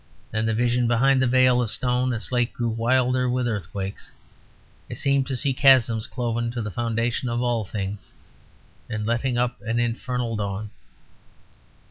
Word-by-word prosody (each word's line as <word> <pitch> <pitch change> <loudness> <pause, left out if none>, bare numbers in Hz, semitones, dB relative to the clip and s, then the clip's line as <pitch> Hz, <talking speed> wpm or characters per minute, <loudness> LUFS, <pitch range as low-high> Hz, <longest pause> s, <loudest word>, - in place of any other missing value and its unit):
Then 110 +1 -1
the 110 - +1
vision 120 +1 +1
behind 130 +3 +3
the 130 - +3
veil 125 0 +4
of 120 - -1
stone 125 +2 0
and 120 - -2
slate 120 +1 0
grew 120 -1 -2
wilder 125 +2 +1
with 125 0 0
earthquakes. 100 -2 -5 0.8
I - - -5
seemed 140 -1 +1
to 135 - -2
see 135 +1 +1
chasms 125 -5 +4
cloven 120 -1 -2
to 120 - -3
the 105 - -4
foundations 115 +3 -1
of 120 +1 -1
all 120 -3 0
things, 100 -1 -5 0.8
and 110 -2 -3
letting 120 +2 0
up 120 -3 -1
an 115 +3 -2
infernal 120 0 -2
dawn. 105 0 -4
120 Hz, 160 wpm, -24 LUFS, 110-125 Hz, 0.8 s, veil